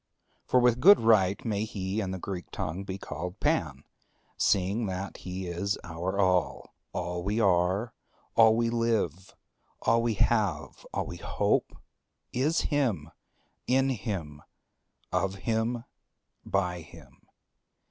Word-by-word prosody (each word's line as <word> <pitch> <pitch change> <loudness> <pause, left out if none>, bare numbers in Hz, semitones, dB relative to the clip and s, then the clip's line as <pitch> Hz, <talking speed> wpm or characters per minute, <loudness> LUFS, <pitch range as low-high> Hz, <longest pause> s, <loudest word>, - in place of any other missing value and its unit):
For 125 - +4
with 125 -1 +3
good 200 +7 +8
right 105 -4 +3
may 105 -2 0
he 100 -1 -3
in 95 - -3
the 95 - -3
Greek 90 -1 -6
tongue 90 +5 -4
be 95 -1 -5
called 90 -1 -6
Pan, - - 0 0.5
seeing 100 +4 +1
that 95 +1 -4
he 95 +1 -6
is 90 +4 -2
our 85 +3 -3
All; 90 -4 +1 0.2
all 90 0 -3
we 105 +4 0
are, 95 +3 +2 0.4
all 110 -1 +7
we 115 0 +1
live, 110 -7 -1 0.5
all 115 0 +4
we 115 -2 0
have, 105 -1 0
all - - -2
we - - -7
hope, - - 0 0.6
is 145 +7 +2
him, 115 - 0 0.6
in 135 +1 +3
him, 95 - -4 0.7
of 95 0 0
him, 115 +1 0 0.6
by 90 -3 -1
him. 80 -2 -16
100 Hz, 130 wpm, -28 LUFS, 90-115 Hz, 0.7 s, good